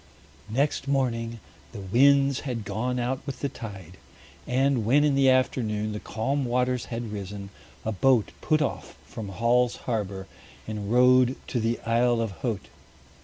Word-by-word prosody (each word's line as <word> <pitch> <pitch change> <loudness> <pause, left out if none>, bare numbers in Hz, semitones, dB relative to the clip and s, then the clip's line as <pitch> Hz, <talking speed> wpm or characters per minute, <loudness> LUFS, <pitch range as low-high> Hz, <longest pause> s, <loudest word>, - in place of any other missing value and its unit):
Next 140 +5 0
morning 115 -4 -1 0.3
the 110 - -7
winds 135 +7 +4
had 120 -6 -4
gone 125 +5 -2
out 125 +2 -1
with 140 - -5
the 140 - 0
tide, 95 -8 -9 0.5
and 130 -1 +2
when 135 +7 +4
in 150 -1 +3
the 135 -1 +4
afternoon 110 -5 +1
the 105 - -4
calm 135 +8 -2
waters 125 0 0
had 115 -2 -5
risen, 100 -1 -6 0.3
a 110 - 0
boat 120 +2 +2
put 155 -1 +2
off 140 - -5
from 105 -3 -7
Hall's 120 +4 +2
Harbor 100 -5 -2 0.4
and 105 -1 -4
rowed 125 +1 +5
to 125 - -1
the 115 +1 0
Isle 120 +1 +2
of 115 -3 -1
Haut. 115 -6 -2
120 Hz, 155 wpm, -26 LUFS, 110-130 Hz, 0.5 s, rowed